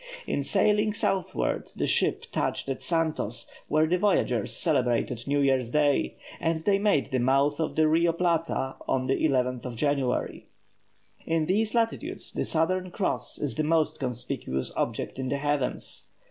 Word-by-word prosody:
In 140 Hz, -, -1 dB
sailing 210 Hz, +5 st, +2 dB
southward, 190 Hz, -3 st, -1 dB
the -, -, -1 dB
ship -, -, +1 dB
touched -, -, -1 dB
at 135 Hz, -, -3 dB
Santos, 160 Hz, -9 st, -1 dB, 0.2 s
where 155 Hz, +1 st, +3 dB
the 180 Hz, +3 st, +1 dB
voyagers 125 Hz, -, +1 dB
celebrated 125 Hz, -5 st, 0 dB
New 145 Hz, +1 st, +2 dB
Year's 130 Hz, -3 st, +2 dB
Day, 145 Hz, +1 st, +2 dB, 0.2 s
and 165 Hz, -1 st, 0 dB
they 195 Hz, +3 st, +2 dB
made 200 Hz, -9 st, +2 dB
the 130 Hz, -, +1 dB
mouth 140 Hz, +4 st, +2 dB
of 160 Hz, -, -1 dB
the 155 Hz, 0 st, +4 dB
Rio 165 Hz, +2 st, +3 dB
Plata 165 Hz, -5 st, 0 dB
on 130 Hz, -1 st, +1 dB
the 130 Hz, -, 0 dB
11th 125 Hz, -4 st, +1 dB
of 125 Hz, -2 st, -5 dB
January. 140 Hz, 0 st, -1 dB, 0.8 s
In 165 Hz, -1 st, +1 dB
these 215 Hz, +6 st, +1 dB
latitudes 230 Hz, -1 st, -1 dB
the -, -, -2 dB
Southern 185 Hz, +3 st, 0 dB
Cross 190 Hz, +2 st, -2 dB
is 145 Hz, -, -2 dB
the 155 Hz, -, -1 dB
most 160 Hz, 0 st, +1 dB
conspicuous 115 Hz, -, -3 dB
object -, -, -2 dB
in 130 Hz, -1 st, -2 dB
the 140 Hz, -, 0 dB
heavens. 145 Hz, -2 st, -2 dB
150 Hz, 160 wpm, -27 LUFS, 130-170 Hz, 0.8 s, the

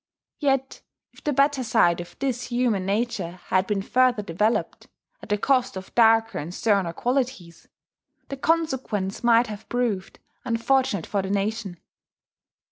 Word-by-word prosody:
Yet 270 Hz, -2 st, 0 dB, 0.3 s
if -, -, -19 dB
the 295 Hz, -, 0 dB
better 275 Hz, -1 st, +2 dB
side 175 Hz, -7 st, +3 dB
of 175 Hz, -, -12 dB
this 255 Hz, -2 st, -2 dB
human 240 Hz, -6 st, 0 dB
nature 210 Hz, -4 st, -1 dB, 0.2 s
had 185 Hz, 0 st, +2 dB
been 200 Hz, -2 st, -1 dB
further 250 Hz, -1 st, +2 dB
developed 205 Hz, +5 st, -1 dB, 0.3 s
at -, -, -12 dB
the 210 Hz, -, +2 dB
cost 255 Hz, -1 st, +1 dB
of 190 Hz, -, -9 dB
darker 225 Hz, -1 st, +4 dB
and 155 Hz, +4 st, -6 dB
sterner 195 Hz, -3 st, +1 dB
qualities, 240 Hz, -7 st, -3 dB, 0.6 s
the 275 Hz, -, -5 dB
consequence 265 Hz, -, -1 dB
might 235 Hz, 0 st, +5 dB
have 210 Hz, -2 st, -9 dB
proved 230 Hz, -6 st, -2 dB, 0.3 s
unfortunate 235 Hz, -4 st, +1 dB
for 200 Hz, -, -1 dB
the 190 Hz, -, -5 dB
nation. 200 Hz, -2 st, -2 dB
225 Hz, 140 wpm, -24 LUFS, 195-255 Hz, 0.6 s, might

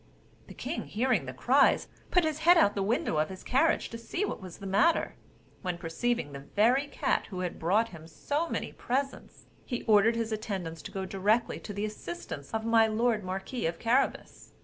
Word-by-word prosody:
The -, -, -11 dB
king -, -, -4 dB
hearing 250 Hz, +4 st, +1 dB
the -, -, -3 dB
cries, -, -, +3 dB, 0.2 s
put 360 Hz, -, +4 dB
his 315 Hz, -1 st, -1 dB
head 345 Hz, +3 st, +6 dB
out 260 Hz, -11 st, +5 dB
at -, -, -17 dB
the 200 Hz, -, -2 dB
window 200 Hz, -5 st, 0 dB
of 155 Hz, -, +1 dB
his 190 Hz, -1 st, -9 dB
carriage 300 Hz, +6 st, +2 dB
to 230 Hz, -, -6 dB
see 355 Hz, -, -2 dB
what -, -, -5 dB
was 185 Hz, -2 st, -9 dB
the 200 Hz, -, -10 dB
matter: 200 Hz, -, +2 dB, 0.5 s
when, 180 Hz, -3 st, -3 dB
perceiving 175 Hz, +2 st, -2 dB
the 140 Hz, -, -7 dB, 0.2 s
very 250 Hz, +7 st, +4 dB
cat -, -, 0 dB
who 185 Hz, -3 st, -5 dB
had 180 Hz, -2 st, -4 dB
brought 210 Hz, +8 st, +2 dB
him 160 Hz, -5 st, -11 dB
so 295 Hz, -, -2 dB
many -, -, -3 dB
presents, 275 Hz, +3 st, -3 dB, 0.2 s
he 245 Hz, -3 st, -4 dB
ordered 220 Hz, +1 st, +5 dB
his 230 Hz, -1 st, -2 dB
attendants 195 Hz, -7 st, -4 dB
to -, -, -8 dB
go 190 Hz, -1 st, -3 dB
directly 205 Hz, +5 st, +1 dB
to -, -, -8 dB
the 205 Hz, +1 st, -2 dB
assistance 170 Hz, -8 st, -7 dB
of 220 Hz, 0 st, -2 dB
my 225 Hz, -1 st, +5 dB
lord 220 Hz, -1 st, +1 dB
marquis 190 Hz, +4 st, -3 dB
of 165 Hz, 0 st, -3 dB
Carabas. 250 Hz, +7 st, -1 dB
220 Hz, 200 wpm, -29 LUFS, 185-245 Hz, 0.5 s, head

